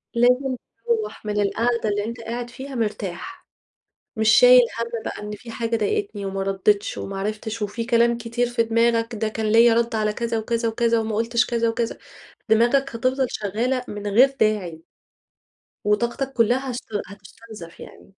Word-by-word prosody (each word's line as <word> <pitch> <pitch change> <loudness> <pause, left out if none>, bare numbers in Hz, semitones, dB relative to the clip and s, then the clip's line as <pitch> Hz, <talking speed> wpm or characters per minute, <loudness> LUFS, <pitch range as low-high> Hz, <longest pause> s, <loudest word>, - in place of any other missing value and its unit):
لازم 250 +2 +3 0.3
تروَّح 445 - -2
من 210 -1 0
القعدة 230 +2 0
اللي 205 0 -1
أنت 230 0 -6
قاعد 235 +1 -5
فيها 265 +3 -8
مرتاح، 210 -6 -4 0.7
مش 220 0 +2
شايل 250 +2 +8 0.2
هَم 230 -1 -3
بقى - - -5
إن 210 0 -6
في 230 +2 -11
حاجة 230 0 -2
ضايقتني 310 - -2
وما 195 0 -3
ردّتش 195 +1 +1
وما 195 0 -5
عرفتش، 215 +2 -4
وفي 210 +3 -3
كلام 235 -1 +3
كتير 235 +1 -1
في 235 -1 +1
دماغك 230 0 +1
ده 220 +1 -1
كان 220 0 -3
ليَّ 230 +2 +5
رد 235 0 +1
على 215 -1 0
كذا 235 0 -2
وكذا 230 +1 -1
وكذا 230 0 +1
وما 220 -1 -2
قُلتش 230 +2 +1
كذا 235 -1 0
وكذا، 230 0 -2 0.5
دماغك 230 +4 +4 0.2
هتفضل 255 +2 +1
شغالة 240 +5 -2
من 205 0 -6
غير 255 +7 +4
داعي. 185 -7 0 1.0
وطاقتك 240 +6 0
كلّها 250 +3 +1
هس 240 - -4 0.3
هتستنزف 200 -2 -13
يعني. - - -13
230 Hz, 160 wpm, -23 LUFS, 210-240 Hz, 1.0 s, شايل